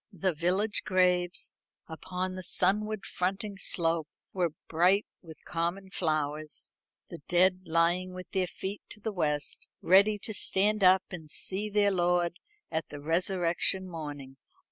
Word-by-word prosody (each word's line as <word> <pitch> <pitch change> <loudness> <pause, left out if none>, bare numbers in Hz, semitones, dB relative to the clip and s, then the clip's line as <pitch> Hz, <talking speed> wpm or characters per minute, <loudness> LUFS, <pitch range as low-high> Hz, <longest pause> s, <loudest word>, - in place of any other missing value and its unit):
The 185 -1 0
village 185 +7 0
graves 180 -2 +1 0.3
upon 180 +3 -4
the 185 - -5
sunward 210 +3 0
fronting 195 +2 -2
slope 165 -4 0 0.3
were 180 -3 +1 0.2
bright 180 +5 +3 0.2
with 160 -4 -13
common 175 +3 -2
flowers; 155 -3 -2 0.4
the - - -8
dead 185 +1 +4
lying 170 +3 +2
with 185 0 -9
their 185 -1 +1
feet 195 +3 -5
to 210 - -10
the 215 +1 -3
west, 150 -5 -1
ready 200 +3 +5
to 220 +2 -6
stand 205 +1 +2
up 185 0 +6
and 160 -4 -8
see 200 +7 -4
their 205 -1 +3
Lord 175 -1 +1 0.3
at 160 0 -2
the 145 - -7
resurrection 175 +3 +1
morning. 145 -5 -7
180 Hz, 140 wpm, -30 LUFS, 165-195 Hz, 0.4 s, up